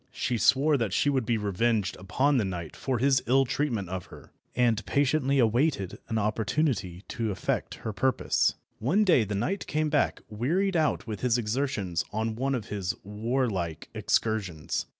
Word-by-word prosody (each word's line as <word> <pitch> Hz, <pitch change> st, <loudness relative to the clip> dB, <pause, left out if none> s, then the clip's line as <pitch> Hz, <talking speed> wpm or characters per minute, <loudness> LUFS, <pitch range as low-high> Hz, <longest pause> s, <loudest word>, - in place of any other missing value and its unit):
She 120 Hz, -2 st, -1 dB
swore 145 Hz, +5 st, +4 dB
that 115 Hz, -7 st, -1 dB
she 145 Hz, -, +2 dB
would 130 Hz, -5 st, 0 dB
be 115 Hz, -, +2 dB
revenged 105 Hz, 0 st, 0 dB
upon 130 Hz, +10 st, +1 dB
the 115 Hz, -, +2 dB
knight 90 Hz, -5 st, -5 dB
for 130 Hz, -2 st, -1 dB
his 130 Hz, +2 st, +3 dB
ill 135 Hz, +2 st, +4 dB
treatment 120 Hz, -7 st, -1 dB
of 95 Hz, -1 st, -5 dB
her, -, -, -14 dB, 0.2 s
and 115 Hz, -3 st, +2 dB
patiently 140 Hz, 0 st, +2 dB
awaited 120 Hz, -, +1 dB
an 110 Hz, -, -1 dB
opportunity 110 Hz, -, -1 dB
to 115 Hz, -2 st, -2 dB
effect 95 Hz, -, -2 dB
her 110 Hz, -, -2 dB
purpose. 130 Hz, +6 st, +1 dB, 0.2 s
One 175 Hz, -, +2 dB
day 165 Hz, -, +4 dB
the 105 Hz, 0 st, -3 dB
knight 170 Hz, -, -2 dB
came 155 Hz, 0 st, 0 dB
back 145 Hz, -3 st, +1 dB
wearied 165 Hz, -, 0 dB
out 155 Hz, -7 st, +1 dB
with 110 Hz, -3 st, -5 dB
his 125 Hz, -1 st, +2 dB
exertions 105 Hz, -7 st, -1 dB
on 110 Hz, +1 st, -2 dB
one 135 Hz, +3 st, 0 dB
of 115 Hz, -4 st, -5 dB
his 95 Hz, -3 st, -2 dB
warlike 105 Hz, -, -2 dB
excursions. 100 Hz, -8 st, -1 dB
115 Hz, 170 wpm, -28 LUFS, 105-135 Hz, 0.2 s, swore